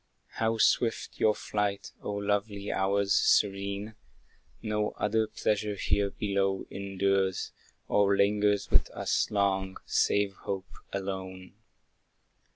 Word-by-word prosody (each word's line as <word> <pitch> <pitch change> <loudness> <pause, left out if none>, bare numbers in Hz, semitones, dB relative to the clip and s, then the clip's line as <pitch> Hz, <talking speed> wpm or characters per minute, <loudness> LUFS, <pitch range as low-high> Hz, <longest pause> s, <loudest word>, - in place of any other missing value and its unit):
How 115 0 +1
swift 115 +1 +1
your 105 -1 +4
flight, 105 -1 -2
O - - -5
lovely 100 0 -1
hours 100 +1 +1
serene! 100 +1 +2 0.7
No 105 -1 -1
other 110 +1 +1
pleasure 105 -1 -1
here 100 +1 +1
below 100 -1 -1
endures, 95 -1 0 0.4
Or 100 -1 +3
lingers 105 0 +2
with - - +3
us - - 0
long, 95 -2 0
save 100 -1 +2
hope 95 -1 -5 0.2
alone. 95 -1 -5
100 Hz, 105 wpm, -29 LUFS, 95-105 Hz, 0.7 s, your